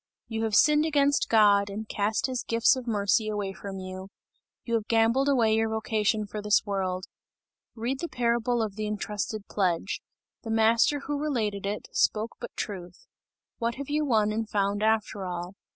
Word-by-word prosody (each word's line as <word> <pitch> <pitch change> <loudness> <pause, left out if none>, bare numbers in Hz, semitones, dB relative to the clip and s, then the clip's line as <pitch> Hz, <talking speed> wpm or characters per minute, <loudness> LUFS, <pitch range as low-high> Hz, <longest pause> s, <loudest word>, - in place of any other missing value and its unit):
You 225 -1 -2
have 215 -2 0
sinned 300 +3 +5
against 285 -2 +2
God, 205 -2 +5
and 210 +2 -6
cast 210 +2 0
his 255 -2 -2
gifts 230 +3 +3
of 255 -2 -7
mercy 210 0 +1
away 205 -2 -3
from 195 0 -7
you; 185 0 -7 0.6
you 235 - -4
have 225 -2 0
gambled 230 +5 +3
away 235 -6 +3
your 225 0 +2
vocation 220 -1 0
for 210 +1 -6
this 210 0 +3
world. 190 -2 -2 0.7
Read 245 +4 -2
the 340 - -3
parable 235 0 +1
of 210 -3 -4
the 215 0 -2
entrusted 210 0 -3
pledge. 185 -1 -1 0.4
The 225 - -8
Master 225 +6 +3
who 290 0 -3
related 215 -9 -1
it, 210 +1 -4
spoke 220 +2 +1
but 240 - -6
truth! 180 -4 -6 0.5
What 235 0 -1
have 280 +1 -7
you 300 +1 +1
won 220 -6 +2
and 220 0 -2
found 200 0 0
after 215 -2 +1
all? 175 +1 -5
220 Hz, 175 wpm, -27 LUFS, 205-235 Hz, 0.7 s, sinned